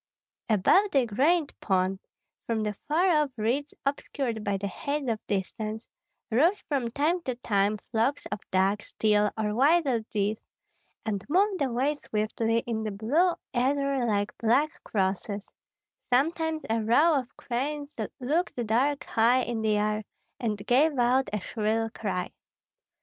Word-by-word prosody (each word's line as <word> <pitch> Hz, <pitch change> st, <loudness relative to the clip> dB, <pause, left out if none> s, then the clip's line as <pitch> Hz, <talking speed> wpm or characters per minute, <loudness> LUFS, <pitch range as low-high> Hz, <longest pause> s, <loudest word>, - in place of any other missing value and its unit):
Above 225 Hz, -, +4 dB
the 270 Hz, -3 st, +3 dB
great 290 Hz, +8 st, +2 dB
pond, 190 Hz, -1 st, 0 dB, 0.5 s
from 225 Hz, -2 st, 0 dB
the 210 Hz, -1 st, -1 dB
far 335 Hz, +6 st, +3 dB
off 295 Hz, -, -1 dB
reeds 255 Hz, +7 st, 0 dB
obscured 270 Hz, -5 st, -2 dB
by 200 Hz, -1 st, 0 dB
the 200 Hz, -, -4 dB
haze 280 Hz, +8 st, -3 dB
of 225 Hz, -2 st, 0 dB
distance, 215 Hz, +3 st, -3 dB, 0.4 s
rose 330 Hz, -, +3 dB
from 265 Hz, -5 st, -1 dB
time 305 Hz, +8 st, 0 dB
to 255 Hz, -6 st, -3 dB
time 210 Hz, -3 st, +1 dB
flocks 240 Hz, +5 st, 0 dB
of 210 Hz, -, -2 dB
ducks, 195 Hz, +2 st, 0 dB
teal, 210 Hz, -1 st, +3 dB
or 210 Hz, -1 st, 0 dB
wild 300 Hz, +8 st, +4 dB, 0.2 s
geese, 210 Hz, +1 st, -1 dB, 0.6 s
and 205 Hz, -3 st, -2 dB
moved 380 Hz, +2 st, +2 dB
away 265 Hz, +2 st, +1 dB
swiftly 225 Hz, -3 st, -1 dB
in 225 Hz, -2 st, -2 dB
the 215 Hz, -, -2 dB
blue 275 Hz, -, +2 dB, 0.2 s
ether 275 Hz, +1 st, +1 dB
like 205 Hz, -2 st, 0 dB
black 285 Hz, +9 st, +1 dB
crosses; 200 Hz, +1 st, -2 dB, 0.6 s
sometimes 320 Hz, +4 st, +1 dB
a 225 Hz, +1 st, +1 dB
row 280 Hz, +8 st, +4 dB
of 250 Hz, -2 st, -10 dB
cranes 285 Hz, +4 st, -3 dB, 0.3 s
looked 305 Hz, +8 st, 0 dB
dark 265 Hz, +6 st, +1 dB
high 240 Hz, +3 st, +3 dB
in 235 Hz, -2 st, -3 dB
the 215 Hz, -1 st, +2 dB
air, 210 Hz, +1 st, 0 dB, 0.4 s
and 215 Hz, -5 st, -2 dB
gave 280 Hz, +5 st, +3 dB
out 250 Hz, +2 st, +3 dB
a 210 Hz, -, -1 dB
shrill 220 Hz, +2 st, -1 dB
cry. 185 Hz, -5 st, -3 dB
235 Hz, 145 wpm, -27 LUFS, 215-285 Hz, 0.6 s, Above